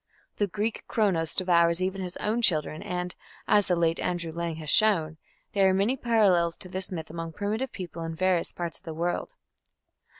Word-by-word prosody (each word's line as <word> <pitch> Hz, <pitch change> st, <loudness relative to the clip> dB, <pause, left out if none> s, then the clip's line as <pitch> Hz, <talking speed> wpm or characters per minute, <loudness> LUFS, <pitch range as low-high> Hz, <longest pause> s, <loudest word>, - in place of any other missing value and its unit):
The 205 Hz, -, +1 dB
Greek 210 Hz, +4 st, -2 dB
Cronos 180 Hz, -8 st, +1 dB
devours 170 Hz, -2 st, +4 dB
even 190 Hz, +1 st, -1 dB
his 180 Hz, 0 st, -4 dB
own 220 Hz, +3 st, 0 dB
children, 155 Hz, -6 st, +2 dB
and, 180 Hz, 0 st, -3 dB, 0.3 s
as 205 Hz, -1 st, +4 dB
the 180 Hz, -, +2 dB
late 165 Hz, -1 st, +1 dB
Andrew 175 Hz, -2 st, -2 dB
Lang 170 Hz, 0 st, -3 dB
has 155 Hz, -1 st, -4 dB
shown, 165 Hz, -8 st, +3 dB, 0.3 s
there 195 Hz, -1 st, +4 dB
are 190 Hz, -, +2 dB
many 205 Hz, +7 st, +2 dB
parallels 200 Hz, -9 st, +3 dB
to 185 Hz, -, -8 dB
this 185 Hz, +1 st, -1 dB
myth 160 Hz, -3 st, -5 dB
among 165 Hz, 0 st, -5 dB
primitive 215 Hz, +7 st, -2 dB
peoples 170 Hz, -3 st, -6 dB
in 165 Hz, -, -5 dB
various 185 Hz, 0 st, +1 dB
parts 170 Hz, -2 st, -5 dB
of -, -, -31 dB
the 160 Hz, -2 st, -6 dB
world. 175 Hz, -, -2 dB
180 Hz, 190 wpm, -27 LUFS, 165-200 Hz, 0.3 s, devours